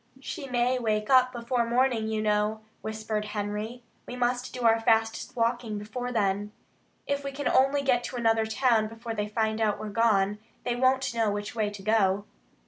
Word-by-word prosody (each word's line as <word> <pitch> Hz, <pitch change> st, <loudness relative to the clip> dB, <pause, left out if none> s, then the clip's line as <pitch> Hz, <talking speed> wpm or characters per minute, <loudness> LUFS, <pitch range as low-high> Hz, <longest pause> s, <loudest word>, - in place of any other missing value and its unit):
"She 275 Hz, 0 st, -6 dB
may 250 Hz, +1 st, +1 dB
wake 215 Hz, -1 st, -1 dB
up 255 Hz, -1 st, +6 dB
before 240 Hz, 0 st, -1 dB
morning, 235 Hz, -1 st, +1 dB
you 220 Hz, -1 st, -1 dB
know," 210 Hz, +1 st, +1 dB, 0.2 s
whispered 220 Hz, -1 st, -3 dB
Henry. 210 Hz, +4 st, -4 dB, 0.2 s
"We 245 Hz, -, -6 dB
must 245 Hz, 0 st, -1 dB
do 250 Hz, -, -6 dB
our 225 Hz, 0 st, +5 dB
fastest 225 Hz, +3 st, +1 dB
walking 230 Hz, -2 st, 0 dB
before 245 Hz, +4 st, -5 dB
then. 205 Hz, -2 st, 0 dB, 0.5 s
If 280 Hz, 0 st, -1 dB
we 275 Hz, -, -4 dB
can 285 Hz, +1 st, -3 dB
only 275 Hz, +2 st, +3 dB
get 250 Hz, -3 st, +2 dB
to -, -, -6 dB
another 225 Hz, -2 st, +2 dB
town 220 Hz, -1 st, +2 dB
before 225 Hz, +1 st, -6 dB
they 210 Hz, -1 st, -2 dB
find 220 Hz, +1 st, -1 dB
out 215 Hz, -2 st, +1 dB
we're 215 Hz, -, -5 dB
gone, 210 Hz, -2 st, +2 dB, 0.2 s
they 245 Hz, -1 st, -1 dB
won't 260 Hz, 0 st, +2 dB
know 225 Hz, -2 st, +1 dB
which 205 Hz, 0 st, -3 dB
way 215 Hz, -2 st, 0 dB
to 205 Hz, -1 st, -10 dB
go." 205 Hz, -2 st, +2 dB
225 Hz, 185 wpm, -27 LUFS, 215-250 Hz, 0.5 s, up